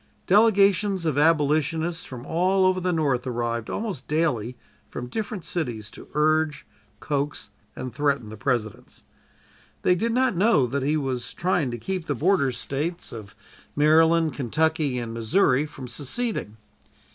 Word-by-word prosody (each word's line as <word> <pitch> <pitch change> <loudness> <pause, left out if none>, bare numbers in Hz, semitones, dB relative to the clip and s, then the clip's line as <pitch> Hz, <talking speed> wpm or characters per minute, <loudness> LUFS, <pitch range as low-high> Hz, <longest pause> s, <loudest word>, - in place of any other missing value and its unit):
Delegations 200 -2 +4
of 155 -4 +1
Abolitionists 160 +2 +1
from 125 -1 -9
all 185 +4 +2
over 185 0 +3
the 180 0 0
North 140 -6 0
arrived 115 -2 -2
almost 200 - -4
daily 125 -7 0 0.3
from 125 - -6
different 210 - -5
cities 120 -11 -3
to - - -12
urge, 155 0 +1 0.3
coax 145 +1 -3 0.2
and 130 -1 -6
threaten 140 -5 0
the 110 - -8
President. 115 -3 -3 0.8
They 180 - +4
did 225 +6 0
not 255 -2 +2
know 190 - +4
that 135 +3 -2
he 150 +4 +1
was 130 -4 -3
trying 175 -6 0
to 120 - -4
keep 185 - -4
the 145 - 0
Border 155 -1 +2
States 145 +8 -4
of 105 -3 -9 0.4
Maryland, 160 +2 +4
Kentucky 150 +1 0
and 115 -2 -4
Missouri 130 - +2
from 135 -4 -9
seceding. 135 - -3
150 Hz, 145 wpm, -25 LUFS, 125-175 Hz, 0.8 s, Delegations